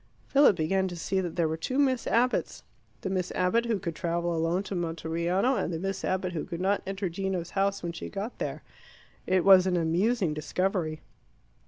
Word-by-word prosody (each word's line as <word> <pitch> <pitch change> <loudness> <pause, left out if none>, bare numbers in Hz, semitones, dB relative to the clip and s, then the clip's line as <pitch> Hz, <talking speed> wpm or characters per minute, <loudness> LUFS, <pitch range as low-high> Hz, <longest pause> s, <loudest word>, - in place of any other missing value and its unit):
Philip 275 -7 +5
began 190 +4 +1
to 175 - -6
see 190 +3 -1
that 175 -3 -4
there 170 -2 +2
were 160 - -1
two 255 +11 -3
Miss 260 -4 +2
Abbotts 245 +2 +1 0.4
the 190 - -3
Miss 185 -2 -1
Abbott 205 +6 +2
who 225 -3 +1
could 175 -4 -4
travel 170 -1 -1
alone 165 +4 0
to 200 - -6
Monteriano, 170 +7 0
and - - -1
the 165 - -2
Miss 195 +3 -3
Abbott 185 -1 -1
who 160 - -2
could 170 - -6
not 195 +2 +1
enter 195 0 -2
Gino's 180 0 -3
house 195 0 0
when 170 - -2
she 170 - -7
got 210 +4 -5
there. - - -4 0.6
It 185 -1 +2
was 190 -1 +8
an 180 -1 +1
amusing 175 +3 +1
discovery. 160 +1 -1
185 Hz, 195 wpm, -28 LUFS, 170-195 Hz, 0.6 s, was